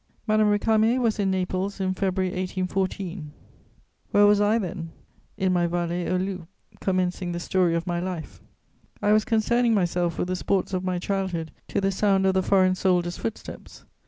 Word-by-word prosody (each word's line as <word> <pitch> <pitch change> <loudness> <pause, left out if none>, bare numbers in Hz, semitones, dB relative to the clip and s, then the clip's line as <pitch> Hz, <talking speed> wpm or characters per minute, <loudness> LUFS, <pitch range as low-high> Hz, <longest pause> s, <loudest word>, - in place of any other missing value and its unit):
Madame 215 -1 +3
Récamier 220 +3 +3
was 230 -4 0
in 195 -1 +1
Naples 190 +1 -2
in 185 -1 0
February 185 -1 -1
1814; 185 -2 -3 0.8
where 205 0 +5
was 205 0 +5
I 210 +2 +3
then? 185 -5 -4 0.5
In 190 -2 +1
my 175 -1 +2
Vallée 175 0 -2
aux 185 - +2
Loups, 185 -2 -4 0.3
commencing 180 -1 -1
the 175 - -3
story 175 -1 +1
of 170 0 -2
my 175 -1 -1
life. 180 -3 -6 0.6
I 205 - +1
was 215 0 +3
concerning 235 +1 +2
myself 175 -3 0
with 180 - -2
the 185 - 0
sports 190 +1 -1
of 185 0 -1
my 185 -1 -1
childhood 180 -3 -2 0.2
to - - -1
the 195 0 +1
sound 195 0 +2
of 190 - +3
the 190 - +2
foreign 185 -1 +3
soldier's 180 -2 0
footsteps. 225 - -7
185 Hz, 175 wpm, -25 LUFS, 180-200 Hz, 0.8 s, where